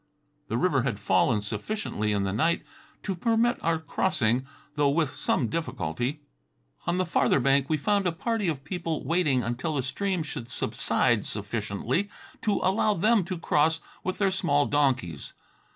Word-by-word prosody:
The - - -1
river - - +2
had - - -2
fallen 105 - +2
sufficiently 105 - -3
in 100 -1 +1
the 95 -1 -1
night 165 +10 +1 0.4
to 195 - -1
permit 230 +5 +1
our 165 0 +2
crossing, 130 -6 0 0.3
though 145 -1 +2
with 150 -1 +1
some 120 - 0
difficulty. 120 - -3 0.7
On 175 - +1
the 185 - +1
farther 170 - +2
bank 135 +1 +2
we 155 - +2
found 200 +4 +1
a - - +2
party 210 +4 -1
of 145 -5 -2
people 165 0 -3
waiting 155 -7 +2
until 125 +8 -2
the 135 - 0
stream 185 +6 -1
should 120 -5 -6
subside 120 -2 0
sufficiently 110 - -2 0.3
to 210 - +1
allow 205 +2 +2
them 215 +3 +3
to 185 0 -4
cross 160 0 +2 0.2
with 185 - -2
their 195 -2 +2
small 145 -6 +2
donkeys. 130 - 0
150 Hz, 160 wpm, -27 LUFS, 120-185 Hz, 0.7 s, them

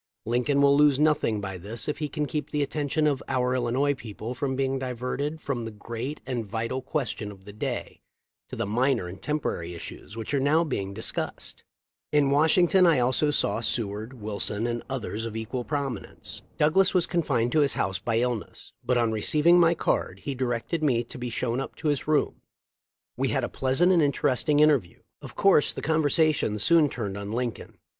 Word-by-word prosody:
Lincoln 125 +5 +2
will 140 0 +6
lose 145 -2 +5
nothing 145 -8 +2
by 95 -2 -5
this 105 +6 -5
if 150 - -2
he 150 -2 -2
can 150 0 -2
keep 150 0 -3
the 150 -1 0
attention 150 +2 -1
of 145 -3 +1
our 125 -1 +1
Illinois 130 +3 +1
people 115 -2 -7
from 130 +1 -2
being 135 0 0
diverted 130 +4 -3
from 135 -6 -3
the 115 - -4
great 115 +6 -6
and 125 -3 -2
vital 115 +5 -3
question 125 -7 -3
of 95 -1 -15
the 105 - -10
day 105 - -4 0.5
to - - -6
the - - -2
minor 120 -1 +1
and 95 +2 -9
temporary 90 - -2
issues 85 +3 -9
w - - -10
r 115 - -3
hich 125 - -6
are 140 - +3
now 150 +5 +3
being 100 -10 -3
dis 110 - -2
cussed."* - - -5 0.5
In 145 -2 +3
Washington 175 +5 +5
I 165 - +5
saw 150 +4 +1
also 115 -7 0
Seward, 110 +1 -3
Wil 105 -1 -5
son, 105 +2 -1
and 120 0 -2
others 115 -4 -3
of 115 -1 -6
equal 115 +3 -3
prominence. 140 -5 -4 0.2
Douglas 185 +6 +3
was 180 - +4
confined 135 -9 0
to 155 - +3
his 140 -2 +1
house 95 0 -1
by 115 +4 -1
illness, 120 -4 -4
but 125 - +1
on 115 -2 +2
receiv 150 +8 +2
ing 175 +1 +7
my 170 0 +5
card - - -1
he 140 - -2
directed 130 +5 -2
me 125 -6 +2
to 125 +3 -11
be 125 0 -3
shown 120 +1 -1
up 135 - -5
to 155 - -2
his 145 -2 -1
room. 155 -1 +1 0.8
We - - +1
had - - 0
a - - -2
pleasant 135 +8 +2
and 175 -3 +4
interesting 145 0 +2
inter 150 -2 +6
view. 85 -5 -19 0.2
Of - - -10
course 195 -7 +4
the - - -7
conversation 155 -6 +2
soon 155 +7 +4
turned 105 -6 -4
on 100 0 -5
Lincoln. 120 0 -4
130 Hz, 205 wpm, -26 LUFS, 115-150 Hz, 0.8 s, ing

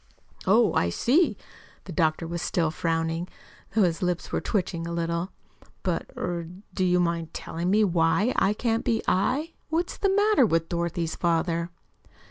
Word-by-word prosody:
"Oh, 215 +2 +5
I 85 - +2
see." 250 - +2 0.5
The 190 - -9
doctor 160 0 +1
was 170 0 -4
still 165 -3 0
frowning, 165 +1 -1 0.5
though 220 - +5
his 170 +1 +1
lips 180 -1 -1
were - - 0
twitching 175 -5 -2
a - - -4
little. 170 +2 -2 0.5
"But 175 -3 -1
er 170 -2 -3 0.3
do 185 - 0
you 180 -1 +3
mind 170 -2 -1
telling 170 +2 -3
me 210 +3 +4
why 180 +5 +2
I 200 - +3
can't 225 0 0
be 225 -1 0
I? 270 - +1 0.2
What's 335 +2 -1
the 395 - +1
matter 410 - +4
with 165 -2 0
Dorothy's 170 -1 -2
father?" 170 0 0
175 Hz, 160 wpm, -26 LUFS, 165-215 Hz, 0.5 s, Oh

